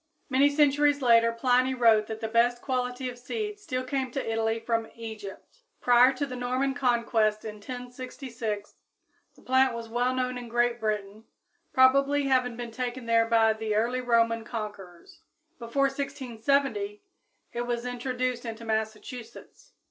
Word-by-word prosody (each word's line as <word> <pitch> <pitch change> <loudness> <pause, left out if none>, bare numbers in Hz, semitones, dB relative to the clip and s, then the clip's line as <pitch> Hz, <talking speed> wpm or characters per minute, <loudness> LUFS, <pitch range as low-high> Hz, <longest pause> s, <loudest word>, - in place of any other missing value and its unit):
Many 275 +2 +4
centuries 290 -1 +3
later 230 -1 +5
Pliny 255 +2 +2
wrote 225 -3 +4
that 220 0 -6
the 220 - -2
best 235 +2 +2
quality 250 0 -2
of 245 -1 -7
seed 420 - -4
still 255 -10 -3
came 260 0 -2
to 270 -4 -2
Italy 225 0 0
from 230 0 -1
Egypt. 220 - -9 0.2
Prior 245 +1 +6
to 260 +2 -2
the 255 -2 -7
Norman 255 +2 -1
conquest 235 -5 +1
in 215 -1 -6
1066, 245 -2 -6 0.6
the - - -20
plant 260 -1 +3
was 230 -1 -7
well 245 +2 0
known 255 -1 -1
in 240 -1 -9
Great 240 0 +1
Britain, 210 0 -3 0.5
probably 275 +2 +4
having 255 -3 +1
been 240 -1 -6
taken 250 +1 -4
there 230 0 +3
by 225 -1 +4
the 220 -1 -3
early 240 +4 +1
Roman 230 -2 +2
conquerors. 205 -6 -8 0.4
Before 235 +4 -1
1670 280 - -1 0.5
it 240 - -2
was 240 0 -2
introduced 250 0 -2
into 230 -1 -7
Massachusetts. 225 - -5
245 Hz, 150 wpm, -27 LUFS, 225-260 Hz, 0.6 s, Prior